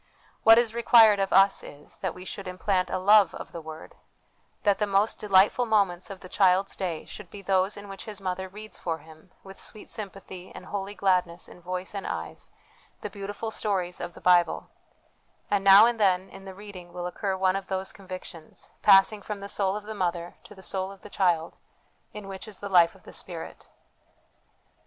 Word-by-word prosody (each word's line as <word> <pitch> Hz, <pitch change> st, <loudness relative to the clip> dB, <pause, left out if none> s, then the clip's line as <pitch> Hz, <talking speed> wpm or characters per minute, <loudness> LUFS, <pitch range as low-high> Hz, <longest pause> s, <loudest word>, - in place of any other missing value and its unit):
What 225 Hz, 0 st, +8 dB
is 235 Hz, -2 st, +2 dB
required 225 Hz, -3 st, +6 dB
of 195 Hz, 0 st, 0 dB
us 195 Hz, +1 st, +5 dB
is, 145 Hz, 0 st, -13 dB
that 185 Hz, -4 st, -3 dB
we 180 Hz, -, -10 dB
should 195 Hz, 0 st, -6 dB
implant 185 Hz, 0 st, 0 dB
a -, -, -1 dB
love 200 Hz, -1 st, +5 dB
of -, -, -8 dB
the 170 Hz, -, -7 dB
Word; 160 Hz, 0 st, -10 dB, 0.7 s
that 200 Hz, -2 st, +3 dB
the 210 Hz, -, +1 dB
most 200 Hz, +2 st, +1 dB
delightful 205 Hz, +4 st, +4 dB
moments 195 Hz, -5 st, +1 dB
of 195 Hz, -2 st, -9 dB
the 185 Hz, -, -10 dB
child's 190 Hz, +1 st, +2 dB
day 175 Hz, -5 st, -4 dB
should 210 Hz, -4 st, -10 dB
be 200 Hz, -1 st, -10 dB
those 190 Hz, +1 st, +1 dB
in 205 Hz, 0 st, -9 dB
which 195 Hz, -1 st, -8 dB
his 210 Hz, -3 st, -7 dB
mother 190 Hz, 0 st, -4 dB
reads 215 Hz, +3 st, -10 dB
for 165 Hz, -2 st, -2 dB
him, 160 Hz, +2 st, -17 dB
with 195 Hz, 0 st, -12 dB
sweet 215 Hz, -, -7 dB
sympathy 195 Hz, -3 st, -8 dB
and -, -, -9 dB
holy 200 Hz, +1 st, -5 dB
gladness 180 Hz, -3 st, 0 dB
in 180 Hz, -, -15 dB
voice 185 Hz, +2 st, -5 dB
and 200 Hz, -, -5 dB
eyes, -, -, -6 dB, 0.5 s
the 210 Hz, -, -5 dB
beautiful 205 Hz, +3 st, -5 dB
stories 185 Hz, -5 st, -2 dB
of 175 Hz, -1 st, -6 dB
the -, -, -13 dB
Bible; 175 Hz, -2 st, +3 dB, 0.8 s
and 200 Hz, -1 st, +2 dB
now 195 Hz, +2 st, +9 dB
and 235 Hz, -1 st, 0 dB
then 190 Hz, -2 st, +2 dB
in 195 Hz, -, -12 dB
the 190 Hz, -1 st, -9 dB
reading 190 Hz, -3 st, -11 dB
will 175 Hz, 0 st, -5 dB
occur 190 Hz, +2 st, -2 dB
one 190 Hz, 0 st, +2 dB
of 195 Hz, 0 st, -4 dB
those 190 Hz, 0 st, -3 dB
convictions, 185 Hz, -4 st, -10 dB
passing 205 Hz, +1 st, +6 dB
from 205 Hz, +1 st, -6 dB
the 200 Hz, -, -7 dB
soul 195 Hz, -1 st, -1 dB
of 210 Hz, -, -5 dB
the 215 Hz, +1 st, -7 dB
mother 175 Hz, -3 st, -2 dB
to 210 Hz, -, -13 dB
the 190 Hz, -, -14 dB
soul 190 Hz, 0 st, -3 dB
of 195 Hz, -, -15 dB
the 210 Hz, -, -11 dB
child, 170 Hz, -4 st, +1 dB, 0.5 s
in 210 Hz, -2 st, -9 dB
which 195 Hz, +2 st, -7 dB
is 210 Hz, -3 st, -6 dB
the 200 Hz, -, -6 dB
life 175 Hz, -3 st, +5 dB
of -, -, -20 dB
the -, -, -12 dB
Spirit. -, -, -7 dB
195 Hz, 205 wpm, -27 LUFS, 180-205 Hz, 0.8 s, now